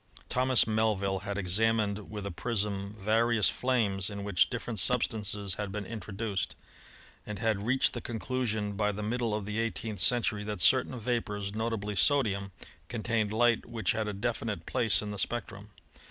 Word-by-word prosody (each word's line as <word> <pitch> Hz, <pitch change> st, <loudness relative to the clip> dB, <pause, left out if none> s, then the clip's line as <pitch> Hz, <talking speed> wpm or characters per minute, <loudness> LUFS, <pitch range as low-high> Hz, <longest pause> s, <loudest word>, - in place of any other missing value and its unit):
Thomas 130 Hz, 0 st, +4 dB
Mel 110 Hz, 0 st, +2 dB
vill 95 Hz, 0 st, -1 dB
had 100 Hz, +1 st, -4 dB
examined 105 Hz, +2 st, +1 dB
with 105 Hz, -2 st, -6 dB
a 100 Hz, -, -3 dB
prism 100 Hz, 0 st, -2 dB
various 110 Hz, -1 st, +3 dB
flames 110 Hz, -7 st, +1 dB
in 100 Hz, -1 st, -6 dB
which 100 Hz, -3 st, +3 dB
different 120 Hz, -3 st, -3 dB
substances 105 Hz, -3 st, +1 dB
had 100 Hz, -2 st, -4 dB
been 105 Hz, 0 st, -4 dB
introduced, 105 Hz, -1 st, -4 dB, 0.7 s
and 105 Hz, -1 st, -6 dB
had 110 Hz, -1 st, 0 dB
reached 130 Hz, +2 st, +3 dB
the 120 Hz, -, -4 dB
conclusion 110 Hz, -3 st, -2 dB
by 105 Hz, +1 st, +1 dB
the 105 Hz, +1 st, -5 dB
middle 115 Hz, 0 st, -1 dB
of 105 Hz, -2 st, -3 dB
the 105 Hz, +2 st, -3 dB
eighteenth 110 Hz, -2 st, -3 dB
century 105 Hz, +1 st, +3 dB
that 105 Hz, -2 st, -4 dB
certain 85 Hz, +9 st, +4 dB
vapors, 105 Hz, -4 st, -2 dB
notably 110 Hz, -2 st, -2 dB
sodium, 100 Hz, -, +3 dB, 0.4 s
contained 115 Hz, -2 st, -1 dB
light 120 Hz, +1 st, +2 dB
which 115 Hz, -2 st, -1 dB
had 110 Hz, -1 st, -1 dB
a 105 Hz, -, -2 dB
definite 110 Hz, -4 st, -3 dB
place 110 Hz, -3 st, +2 dB
in 105 Hz, -, -4 dB
the 105 Hz, -, -5 dB
spectrum. 105 Hz, -3 st, -3 dB
105 Hz, 165 wpm, -30 LUFS, 100-115 Hz, 0.7 s, Thomas